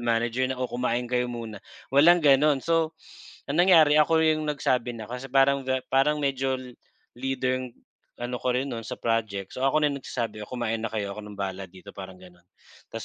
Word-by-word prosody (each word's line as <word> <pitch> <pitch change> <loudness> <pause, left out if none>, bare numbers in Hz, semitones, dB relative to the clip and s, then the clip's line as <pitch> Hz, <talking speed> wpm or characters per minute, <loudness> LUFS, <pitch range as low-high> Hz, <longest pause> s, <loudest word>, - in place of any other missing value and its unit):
manager 120 +2 0
na 130 - -3
kumain 125 -1 -1
kayo 125 0 0
muna, 115 -4 -7 0.3
walang 165 +4 +6
gano'n. 145 +1 +5
So, 165 -1 +1 0.5
ang 155 +4 +2
nangyari 160 -5 +6
ako 160 +1 +3
'yong 155 -1 +1
nagsabi 125 -4 0
na, 110 - -7
kasi 125 +2 -6
parang 135 +1 +3
ga 130 -1 0
parang 140 +3 +3
medyo 135 -1 0
li 130 -1 -10 0.5
leader 130 -1 -1 0.5
ano 120 +1 -4
ko 125 -1 0
rin 130 - 0
no'n 115 -1 -6
sa - - -5
project, 110 -4 -2
so - - -7
ako 150 +3 +2
na 145 - +2
'yong 140 - -5
nagsasabi, 115 -4 -4
"O, - - -21
kumain 115 -3 -2
na 115 - -2
kayo, 105 -2 -3
ako 105 - -7
ng 105 -1 -10
bahala 95 -1 -4
dito," 95 +2 -13
parang 95 -1 -9
gano'n, 90 -1 -17 0.4
"'Tas, - - -7
125 Hz, 200 wpm, -26 LUFS, 115-140 Hz, 0.5 s, walang